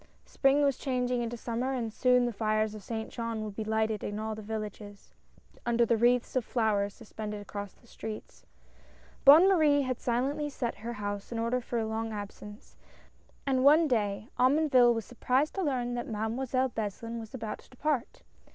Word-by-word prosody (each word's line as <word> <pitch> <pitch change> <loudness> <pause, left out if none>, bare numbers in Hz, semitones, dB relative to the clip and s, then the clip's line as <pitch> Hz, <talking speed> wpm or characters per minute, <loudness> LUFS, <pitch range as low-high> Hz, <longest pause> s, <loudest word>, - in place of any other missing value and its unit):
Spring 275 +1 +3
was 280 -2 +1
changing 250 -2 0
into 235 0 -3
Summer, 240 +3 -2
and 230 -4 -3
soon 250 0 +3
the 240 - -2
fires 215 0 0
of 215 - -8
Saint 220 +1 -5
Jean 230 -2 -3
would 210 -2 -6
be 220 - -3
lighted 220 -1 0
in 205 - -3
all 220 0 -3
the 215 - -7
villages, 210 -1 -7 0.5
under 235 0 +2
the 230 - +3
wreaths 240 +3 +2
of 255 - +2
flowers 210 -4 0
suspended 215 -2 -7
across 205 -1 -7
the - - -25
streets. 220 -2 -8 0.8
Bonne 310 +7 +9
Marie 305 -7 +4
had 255 -2 -2
silently 270 +5 -1
set 245 -4 -3
her 230 +3 -5
house 205 -1 -5
in 235 - -3
order 235 +2 0
for 240 0 -4
a 225 - 0
long 220 +1 -3
absence, 210 0 -9 0.7
and 260 -2 +1
one 305 +4 +6
day 210 -4 0
Omonville 255 -2 +5
was 225 - -3
surprised 255 +4 0
to 390 - -2
learn 250 -7 -1
that 240 0 -3
Mademoiselle 245 +4 -1
Beslin 230 +1 -4
was 225 +2 -9
about 220 -4 -5
to - - -19
depart. 270 -1 -2
235 Hz, 180 wpm, -30 LUFS, 215-255 Hz, 0.8 s, Bonne